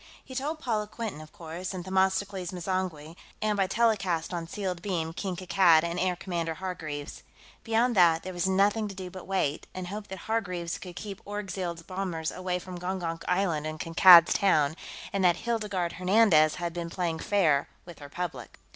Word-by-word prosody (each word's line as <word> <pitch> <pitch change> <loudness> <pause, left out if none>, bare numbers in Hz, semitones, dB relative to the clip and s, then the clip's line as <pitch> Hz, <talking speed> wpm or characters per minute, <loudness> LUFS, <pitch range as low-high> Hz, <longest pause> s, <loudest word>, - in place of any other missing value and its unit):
He 260 - -10
told 285 +5 -2
Paula 225 -8 -1
Quinton, 215 -8 -6
of 155 - -13
course, 175 +3 -6
and 180 -1 -6
Themistocles 190 0 0
M'zangwe, 175 -3 -3 0.2
and, 215 -1 0
by 195 -2 +1
telecast 195 -7 +1
on 170 -1 -3
sealed 185 -1 -4
beam, 170 -4 -2
King 185 +1 -3
Kankad 175 -3 +4
and 170 +1 -2
Air 180 0 +1
Commodore 170 -3 -3
Hargreaves. 155 -5 -6 0.4
Beyond 230 +2 +2
that, 170 -3 +5
there 185 - -6
was 175 +1 0
nothing 205 +3 +2
to 200 - -8
do 185 -1 -7
but 185 -1 -10
wait, 175 -6 -1
and 185 -1 -5
hope 205 +1 -6
that 190 - -7
Hargreaves 180 -6 -2
could 180 -4 -9
keep 200 0 -7
Orgzild's 190 -5 -4
bombers 180 -3 -3
away 185 -1 -2
from 180 0 -8
Gongonk 175 -2 -3
Island 175 -5 0
and 155 0 -6
Kankad's 170 +1 +8
Town 155 -7 +3 0.4
and 195 -1 0
that 175 -1 +4
Hildegarde 210 -7 -2
Hernandez 180 -5 +4
had 170 -1 -4
been 170 -1 -4
playing 170 -2 -2
fair 160 -9 +2 0.2
with 175 -2 -12
her 145 -1 -10
public. 175 +2 -6
180 Hz, 180 wpm, -28 LUFS, 170-195 Hz, 0.4 s, Kankad's